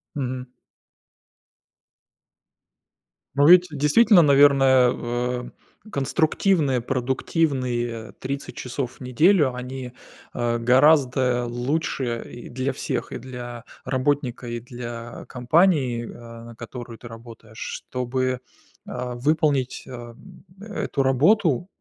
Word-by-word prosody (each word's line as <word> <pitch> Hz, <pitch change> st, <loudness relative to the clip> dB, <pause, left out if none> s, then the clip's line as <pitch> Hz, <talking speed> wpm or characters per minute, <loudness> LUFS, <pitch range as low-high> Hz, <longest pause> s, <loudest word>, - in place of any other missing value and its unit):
Мгм. 130 Hz, -2 st, -4 dB, 2.9 s
Но 145 Hz, +1 st, +4 dB
ведь 180 Hz, +1 st, +8 dB
действительно, 160 Hz, +8 st, +5 dB
наверное, 135 Hz, -3 st, +5 dB
в -, -, -7 dB, 0.8 s
а, 215 Hz, -, -14 dB
конструктивные 155 Hz, -1 st, +1 dB
продуктивные 125 Hz, -2 st, -1 dB
30 140 Hz, +1 st, -5 dB
часов 125 Hz, 0 st, -4 dB
в -, -, -22 dB
неделю- 145 Hz, -, +3 dB
они, 125 Hz, 0 st, -6 dB, 0.4 s
а, 120 Hz, -1 st, 0 dB
гораздо 125 Hz, 0 st, +3 dB
лучше 120 Hz, -1 st, -2 dB
и 120 Hz, -, -10 dB
для 130 Hz, +2 st, -2 dB
всех: 130 Hz, -1 st, -4 dB
и -, -, -4 dB
для 120 Hz, -1 st, -8 dB, 0.2 s
работника, 130 Hz, -2 st, -1 dB
и 120 Hz, 0 st, -4 dB
для 120 Hz, -1 st, -8 dB
компании, 130 Hz, -3 st, +2 dB
а, 115 Hz, -1 st, -11 dB
на 115 Hz, 0 st, -11 dB
которую 120 Hz, 0 st, -9 dB
ты 120 Hz, -, -11 dB
работаешь, 115 Hz, -1 st, -13 dB
чтобы, 130 Hz, +1 st, -3 dB, 0.5 s
а, 125 Hz, -1 st, -5 dB
выполнить, 145 Hz, -1 st, 0 dB
а, 120 Hz, -2 st, -8 dB
м, 185 Hz, +9 st, -16 dB, 0.2 s
эту 205 Hz, -9 st, -2 dB
работу 155 Hz, -, +3 dB
130 Hz, 105 wpm, -23 LUFS, 120-145 Hz, 2.9 s, ведь